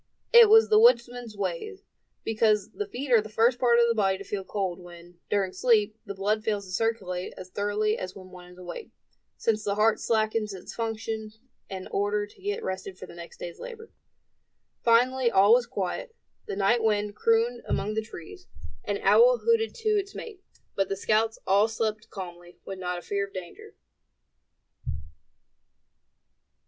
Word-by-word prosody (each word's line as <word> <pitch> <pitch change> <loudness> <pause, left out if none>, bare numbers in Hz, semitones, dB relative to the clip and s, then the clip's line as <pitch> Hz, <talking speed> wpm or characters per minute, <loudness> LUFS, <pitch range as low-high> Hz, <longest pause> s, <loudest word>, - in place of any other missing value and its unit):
It 470 -2 +9
was 445 +1 +7
the 430 0 +6
woodsman's 240 - +3
way, 195 - -3 0.5
because 215 -2 +1
the 415 - -4
feet 280 -8 -5
are 230 -3 +6
the 215 - -9
first 230 +3 +2
part 240 -2 +4
of 235 - +5
the 230 - +2
body 195 -3 +1
to 200 - -8
feel 200 0 -4
cold, 190 -2 -3
when, 175 0 -14
during 195 -2 0
sleep, 215 -1 +2
the 200 - -5
blood 210 +3 0
fails 210 -3 -1
to 185 - -11
circulate 185 -4 -2
as 185 0 -10
thoroughly 210 +2 0
as 185 0 -6
when 185 -1 -12
one 180 -1 -12
is - - -19
awake, 180 - -8 0.5
since 215 -1 0
the 200 -1 -1
heart 215 +1 +3
slackens 215 -2 0
its 185 - -9
functions, 220 -1 -4 0.3
in 190 -1 -6
order 205 +1 0
to 205 - -20
get 410 +3 -3
rested 190 0 -5
for - - -9
the - - -13
next 170 0 -11
day's 170 -1 -8
labor. 455 -2 -9 0.9
Finally 245 +2 +4
all 200 0 +5
was 245 0 +3
quiet. 205 - -4 0.3
The - - -4
night 205 +4 +2
wind 210 -1 +1
crooned 230 +2 +2
among 210 +2 -1
the 220 - 0
trees; 215 - -11 0.4
an - - -2
owl - - +6
hooted 460 -1 +2
to 450 -2 -2
its 405 -2 0
mate; 420 -5 -8 0.3
but 195 -1 0
the 195 - -2
scouts 220 +2 +1
all 200 +3 +4
slept 220 -1 -3
calmly, 175 -2 -9
with 190 -1 -7
not 180 -1 -3
a 175 - -8
fear 200 0 -2
of 195 - -22
danger. 185 -2 -9
215 Hz, 175 wpm, -27 LUFS, 195-235 Hz, 0.9 s, It